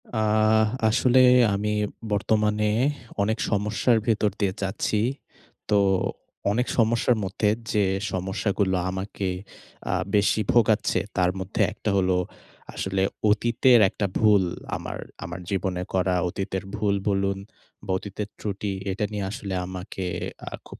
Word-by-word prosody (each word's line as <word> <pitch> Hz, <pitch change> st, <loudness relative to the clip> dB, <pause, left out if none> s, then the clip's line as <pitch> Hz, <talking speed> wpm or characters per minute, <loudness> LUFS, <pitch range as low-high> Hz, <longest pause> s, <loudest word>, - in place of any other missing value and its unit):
আহ 110 Hz, 0 st, +3 dB, 0.2 s
আসলে 125 Hz, +2 st, +4 dB, 0.4 s
আমি 105 Hz, +1 st, -1 dB, 0.4 s
বর্তমানে 105 Hz, +1 st, +1 dB, 0.5 s
অনেক 110 Hz, +3 st, +1 dB
সমস্যার 105 Hz, +3 st, +2 dB
ভেতর 110 Hz, -2 st, +2 dB
দিয়ে 100 Hz, -2 st, +1 dB
যাচ্ছি। 100 Hz, +2 st, -1 dB, 0.7 s
তো, 105 Hz, -1 st, +4 dB, 0.7 s
অনেক 125 Hz, +4 st, 0 dB
সমস্যার 115 Hz, +1 st, +3 dB
মধ্যে 100 Hz, +2 st, 0 dB, 0.2 s
যে 105 Hz, -2 st, +3 dB, 0.3 s
সমস্যাগুলো 95 Hz, +1 st, 0 dB
আমাকে, 95 Hz, +1 st, -3 dB, 0.6 s
আ -, -, 0 dB, 0.2 s
বেশি 105 Hz, +1 st, +3 dB
ভোগাচ্ছে 110 Hz, -2 st, +3 dB, 0.2 s
তার 90 Hz, -1 st, +3 dB
মধ্যে 95 Hz, +2 st, -2 dB
একটা 110 Hz, -, -3 dB
হলো, 95 Hz, -1 st, +2 dB, 0.6 s
আসলে 95 Hz, 0 st, -1 dB, 0.3 s
অতীতের 120 Hz, +3 st, +4 dB
একটা 100 Hz, -, -2 dB
ভুল 105 Hz, -3 st, +5 dB, 0.3 s
আমার -, -, -5 dB, 0.3 s
আমার 90 Hz, +2 st, -6 dB
জীবনে 95 Hz, -2 st, -1 dB
করা 95 Hz, -1 st, +2 dB
অতীতের 95 Hz, +1 st, -3 dB
ভুল 105 Hz, -1 st, +1 dB
বলুন, 100 Hz, 0 st, 0 dB, 0.5 s
বা -, -, -3 dB
অতীতের 100 Hz, +2 st, -6 dB
ত্রুটি 100 Hz, 0 st, -3 dB, 0.2 s
এটা 105 Hz, +3 st, -1 dB
নিয়ে 105 Hz, -2 st, -2 dB
আসলে 100 Hz, -2 st, -5 dB
আমাকে 95 Hz, +1 st, -6 dB, 0.4 s
আ -, -, -22 dB, 0.2 s
খুব -, -, -12 dB
105 Hz, 125 wpm, -25 LUFS, 95-110 Hz, 0.7 s, ভুল